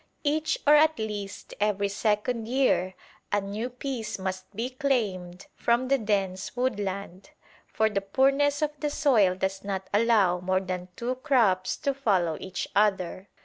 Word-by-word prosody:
Each 310 Hz, +1 st, +1 dB
or 295 Hz, -, +7 dB
at 310 Hz, +1 st, +5 dB
least 210 Hz, -3 st, -5 dB
every 205 Hz, -1 st, +1 dB
second 220 Hz, +3 st, -1 dB
year 235 Hz, -8 st, +1 dB, 0.4 s
a 205 Hz, -, +3 dB
new 205 Hz, +5 st, -4 dB
piece 250 Hz, -3 st, -4 dB
must 190 Hz, -1 st, -5 dB
be 235 Hz, +5 st, -3 dB
claimed 200 Hz, -10 st, -2 dB
from 240 Hz, +2 st, +1 dB
the 275 Hz, 0 st, +3 dB
dense 195 Hz, -3 st, -1 dB
woodland, 200 Hz, -4 st, -3 dB, 0.4 s
for 220 Hz, -, +1 dB
the 205 Hz, -2 st, -1 dB
poorness 275 Hz, +8 st, +2 dB
of 300 Hz, -, +1 dB
the 300 Hz, -, -1 dB
soil 240 Hz, -12 st, +3 dB
does 190 Hz, +1 st, -2 dB
not 195 Hz, -1 st, -4 dB
allow 205 Hz, -5 st, +3 dB
more 185 Hz, +1 st, +1 dB
than 180 Hz, -1 st, -5 dB
two 245 Hz, +2 st, -2 dB
crops 220 Hz, -11 st, +2 dB
to 280 Hz, -, -1 dB
follow 190 Hz, -11 st, +1 dB
each 190 Hz, -, -4 dB
other. 195 Hz, -2 st, +1 dB
210 Hz, 150 wpm, -27 LUFS, 190-255 Hz, 0.4 s, or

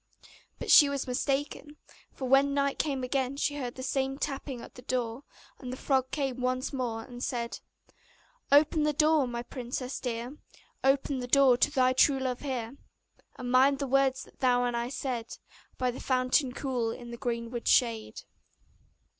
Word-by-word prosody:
But -, -, -2 dB
she 290 Hz, -, +9 dB
was 280 Hz, -1 st, -2 dB
mistaken; 285 Hz, +3 st, -2 dB, 0.3 s
for 260 Hz, -, -5 dB
when 275 Hz, +2 st, +4 dB
night 280 Hz, -1 st, 0 dB
came 275 Hz, -4 st, -1 dB
again 265 Hz, +1 st, -1 dB
she 290 Hz, 0 st, -1 dB
heard 250 Hz, -4 st, -4 dB
the 260 Hz, -, -7 dB
same 270 Hz, 0 st, -1 dB
tapping 275 Hz, -2 st, -4 dB
at 235 Hz, -, -11 dB
the 250 Hz, -, -12 dB
door; 245 Hz, -1 st, -2 dB, 0.4 s
and 250 Hz, -2 st, -7 dB
the 255 Hz, -, -5 dB
frog 260 Hz, -2 st, 0 dB
came 270 Hz, -3 st, -2 dB
once 255 Hz, +2 st, -1 dB
more, 235 Hz, -4 st, -3 dB
and 245 Hz, 0 st, -9 dB
said: 235 Hz, -2 st, -3 dB, 0.9 s
'Open 300 Hz, +2 st, +5 dB
the 300 Hz, 0 st, +2 dB
door, 305 Hz, -2 st, +3 dB
my 235 Hz, 0 st, -4 dB
princess 250 Hz, +1 st, -5 dB
dear, 245 Hz, +3 st, -4 dB, 0.5 s
Open 270 Hz, 0 st, +2 dB
the 245 Hz, -, -4 dB
door 270 Hz, -1 st, +5 dB
to 270 Hz, -, +3 dB
thy 255 Hz, -3 st, +2 dB
true 270 Hz, +1 st, +4 dB
love 255 Hz, -2 st, -2 dB
here! 260 Hz, -2 st, -4 dB, 0.6 s
And 245 Hz, -1 st, -5 dB
mind 270 Hz, +2 st, +5 dB
the 280 Hz, -, -2 dB
words 270 Hz, 0 st, +2 dB
that -, -, -19 dB
thou 245 Hz, -1 st, +3 dB
and 240 Hz, -1 st, -1 dB
I 235 Hz, +1 st, -2 dB
said 250 Hz, -3 st, -4 dB, 0.4 s
By 255 Hz, -1 st, 0 dB
the 245 Hz, -, -9 dB
fountain 255 Hz, +1 st, +1 dB
cool, 250 Hz, -3 st, -2 dB
in 240 Hz, +1 st, -7 dB
the 235 Hz, -, -7 dB
greenwood 235 Hz, -1 st, -4 dB
shade. 230 Hz, -3 st, +1 dB
260 Hz, 175 wpm, -29 LUFS, 245-275 Hz, 0.9 s, she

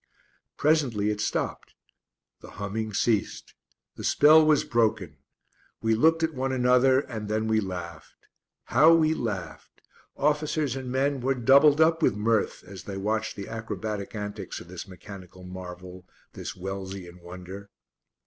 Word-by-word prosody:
Presently 130 Hz, -9 st, +2 dB
it 105 Hz, 0 st, -3 dB
stopped. -, -, -3 dB, 0.6 s
The -, -, -13 dB
humming 105 Hz, +2 st, -3 dB
ceased. 105 Hz, 0 st, -1 dB, 0.4 s
The -, -, -7 dB
spell 155 Hz, +2 st, +6 dB
was 155 Hz, -1 st, +3 dB
broken. 110 Hz, -, 0 dB, 0.6 s
We 115 Hz, 0 st, +1 dB
looked 160 Hz, +8 st, +3 dB
at 160 Hz, 0 st, 0 dB
one 130 Hz, 0 st, -2 dB
another, 130 Hz, +1 st, +4 dB
and 110 Hz, -6 st, -7 dB
then 110 Hz, +1 st, 0 dB
we 110 Hz, 0 st, +2 dB
laughed. 90 Hz, -5 st, -7 dB, 0.4 s
How 155 Hz, +7 st, +5 dB
we 160 Hz, -1 st, +3 dB
laughed! 100 Hz, -, -6 dB, 0.4 s
Officers 150 Hz, -1 st, 0 dB
and 130 Hz, -2 st, -5 dB
men 135 Hz, +1 st, 0 dB
were 135 Hz, +2 st, +1 dB
doubled 140 Hz, +4 st, +5 dB
up 160 Hz, +1 st, +4 dB
with 125 Hz, -, +3 dB
mirth 110 Hz, +1 st, 0 dB
as 95 Hz, -2 st, -11 dB
they 100 Hz, -1 st, -6 dB
watched 110 Hz, +2 st, -2 dB
the 100 Hz, -1 st, -7 dB
acrobatic 105 Hz, -2 st, -5 dB
antics 105 Hz, -2 st, -6 dB
of 85 Hz, -, -13 dB
this 95 Hz, +3 st, -8 dB
mechanical 95 Hz, -1 st, -12 dB
marvel 90 Hz, 0 st, -9 dB, 0.3 s
this -, -, -7 dB
Wellsian 95 Hz, -1 st, -7 dB
wonder. 95 Hz, +3 st, -10 dB
110 Hz, 140 wpm, -26 LUFS, 95-135 Hz, 0.6 s, spell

